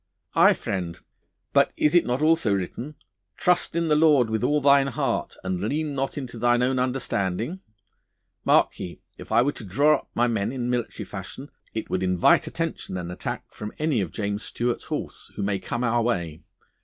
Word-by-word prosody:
'Aye, - - +6
friend, 90 -4 -4 0.5
but - - +4
is 150 - +3
it 175 - +4
not 125 +4 0
also 160 -8 +3
written, 120 +10 -5 0.4
"Trust 180 -1 +2
in 170 0 +1
the 150 - +3
Lord 150 -7 +4
with 110 +1 -1
all 150 +4 +3
thine 140 -1 +5
heart, 135 -2 -2
and 95 -1 -2
lean 145 +8 -1
not 135 +2 -2
unto 125 -4 -6
thine 120 +1 +3
own 130 +1 +1
understanding!" 125 - -1 0.8
Mark - - +3
ye, 85 - -6 0.2
if - - -10
I 120 - +5
were 140 - +1
to 120 - -10
draw 140 +11 +3
up - - -15
my 120 - +3
men 110 -2 0
in 125 -2 -2
military 120 -2 -3
fashion 105 +8 -8 0.2
it 110 - -4
would 95 - 0
invite 90 -2 +3
attention 95 - -3
and 90 -1 -5
attack 90 - -5
from 105 0 -7
any 150 -7 +1
of 90 -5 -3
James 100 +1 -2
Stuart's 120 +1 -2
horse - - -5
who - - -3
may 100 -1 0
come 120 +5 -3
our 120 0 +2
way. 85 -9 -2
120 Hz, 190 wpm, -25 LUFS, 100-140 Hz, 0.8 s, Aye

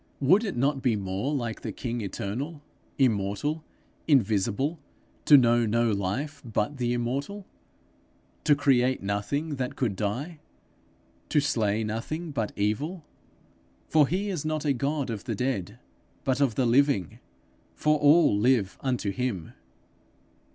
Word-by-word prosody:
Would 180 - +4
it 195 - -3
not 135 +2 +1
be 125 -4 +2
more 100 +6 -2
like 120 -6 -3
the - - -4
king 120 -2 -4
eternal, 130 - -5 0.3
immortal, 125 +5 0 0.4
invisible, 130 - +2 0.5
to 145 - +9
know 120 -2 +4
no 115 +1 +2
life 125 +10 -2
but 115 +3 -2
the 120 -1 0
immortal? 140 +12 -3 1.0
to 150 - +5
create 130 -4 +2
nothing 140 +10 -2
that 130 -1 -3
could 115 -7 -1
die; 125 - -3 0.9
to 150 - +3
slay 110 -6 0
nothing 150 +10 -4
but 115 -7 -2
evil? 150 - -2 0.8
'For 150 -3 +5
he 195 +6 -1
is 175 -6 -3
not 155 -1 -2
a 145 - +3
God 140 0 -1
of 110 -1 -6
the 115 -4 -2
dead, 125 -6 -2 0.5
but 130 +1 0
of 130 -6 +2
the 130 - +1
living; 120 - +2 0.6
for 150 0 +2
all 150 -3 +5
live 105 -3 +2
unto 125 -6 -1
him.' 105 -8 -3
130 Hz, 135 wpm, -27 LUFS, 110-145 Hz, 1.0 s, to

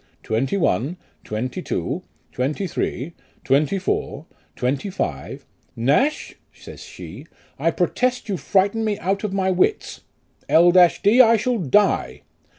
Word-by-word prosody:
" - - -40
Twenty 130 - -1
one, 155 - 0 0.3
twenty 115 +4 -4
two, - - -3 0.3
twenty 145 +10 -2
three, 155 -2 -3 0.3
twenty 145 +7 +2
four, 175 -5 -3 0.3
twenty 130 +9 -2
five." 75 - -5 0.3
"Nash," 145 - +1 0.2
says - - -13
she, - - -11 0.3
"I - - +2
pro - - +1
test 250 -1 -1
you 200 - -1
frighten 200 +7 +1
me 210 -2 -1
out 195 0 -2
of 210 - -2
my 190 -1 0
wits. 185 - 0 0.5
L 175 +2 +6
d, 185 +6 +5
I 230 -2 +5
shall 235 +2 -1
die 195 +5 +1
185 Hz, 140 wpm, -22 LUFS, 135-205 Hz, 0.5 s, L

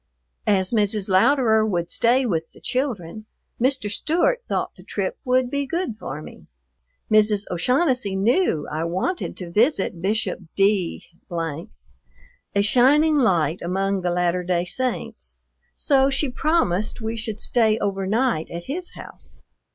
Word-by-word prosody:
As 190 -3 +2
Mrs. 210 -2 +1
Louderer 220 +2 +4
would 175 -5 -1
stay 250 +3 +2
with 165 -7 -2
the - - -16
children, 220 - -3 0.3
Mr. 260 -3 +1
Stewart 340 - +1
thought - - -1
the - - -16
trip - - -4
would 255 -1 +1
be 280 -1 -1
good 340 -7 -2
for 145 +3 -6
me. - - -13 0.7
Mrs. 210 -1 +4
O'Shaughnessy 250 - +1
knew 205 - +1
I 155 +2 -2
wanted 185 - -2
to 175 -2 -6
visit 205 - +1
Bishop 215 +4 -1 0.2
D, 195 -3 +1 0.3
a 65 - -6
shining 290 +8 +4
light 170 - +2
among 195 +2 -1
the 180 - -1
Latter 175 0 +1
Day 175 -1 0
Saints, 255 +6 -4 0.4
so 270 -2 +3
she 275 +1 0
promised 250 - 0
we 225 0 -3
should 220 -1 -5
stay 220 -3 +2
overnight 200 -1 0
at 170 0 -6
his 350 - -5
house. - - -12
210 Hz, 135 wpm, -23 LUFS, 180-255 Hz, 0.7 s, Louderer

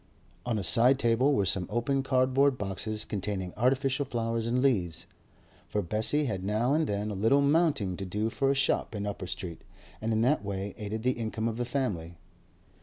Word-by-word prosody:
On 115 -2 0
a 100 - -2
side 125 +6 +6
table 120 +2 +2
were 100 - +2
some 95 -1 +1
open 120 +5 0
cardboard 130 +1 +2
boxes 105 +1 -3
containing 95 -3 -4
artificial 130 +4 +1
flowers 115 -3 -2
and 120 +2 +1
leaves; 90 - +1 0.6
for 105 - -1
Bessie 110 - +1
had 95 -7 -3
now 110 +7 +1
and 155 +1 +1
then 105 +1 -2
a - - -3
little 115 +8 +3
'mounting' 140 - +2
to 95 - -5
do 105 +4 -1
for 135 +2 0
a 140 - +2
shop 135 -4 0
in 105 0 -3
Upper 100 -3 -5
Street, 90 -2 -5 0.4
and 110 +1 -1
in 110 0 +1
that 125 -1 +2
way 100 0 -4
aided 110 +1 -5
the 125 - +3
income 115 -2 -3
of 115 -1 -3
the 120 - -1
family. 100 -11 -3
115 Hz, 190 wpm, -29 LUFS, 100-130 Hz, 0.6 s, side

